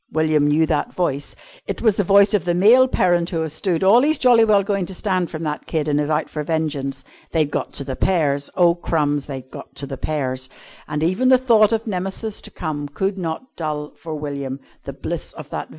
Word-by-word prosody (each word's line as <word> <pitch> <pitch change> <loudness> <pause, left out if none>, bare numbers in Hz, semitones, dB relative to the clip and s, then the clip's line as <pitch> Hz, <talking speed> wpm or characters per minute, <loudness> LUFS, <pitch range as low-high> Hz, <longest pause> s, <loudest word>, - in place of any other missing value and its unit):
William 155 -1 +2
knew 155 +2 +3
that 155 -2 -1
voice. 145 -6 -2 0.3
It - - -4
was 220 -4 +4
the 205 - +2
voice 200 +2 +5
of 205 -6 +2
the 175 -1 0
male 235 +8 +6
parent 175 -7 +1
who 165 -3 -2
has 160 -2 -4
stood 170 +2 -1
all 210 +6 +6
he's 310 +3 +3
jolly 245 -3 +5
well 210 -3 +4
going 195 -3 -1
to 190 - -7
stand 185 -3 -1
from 155 0 -6
that 150 -1 -4
kid, 155 -2 -1
and 150 0 +1
is 150 - -2
out 155 0 0
for 150 - -5
vengeance. 145 -4 -2 0.3
They'd 155 -3 +1
got - - -3
to 140 - -3
the 135 -1 -5
pears! 145 -6 +1
Oh, 175 -2 +5
crumbs! 150 -4 -1
They'd 130 -2 -7
got - - -11
to 140 - -5
the 135 -1 -6
pears! 130 -4 -3 0.4
And 150 +1 -2
even 185 +10 +2
the 260 - +7
thought 230 -4 +4
of 225 0 0
Nemesis 195 +2 -4
to - - -10
come 150 -3 -4
could 190 +7 -2
not 170 +9 -5
dull 150 -2 -4
for 160 -2 -7
William 140 -2 -5 0.3
the - - -6
bliss - - -5
of - - -11
that - - -4
vision. - - -34
160 Hz, 230 wpm, -21 LUFS, 145-195 Hz, 0.4 s, the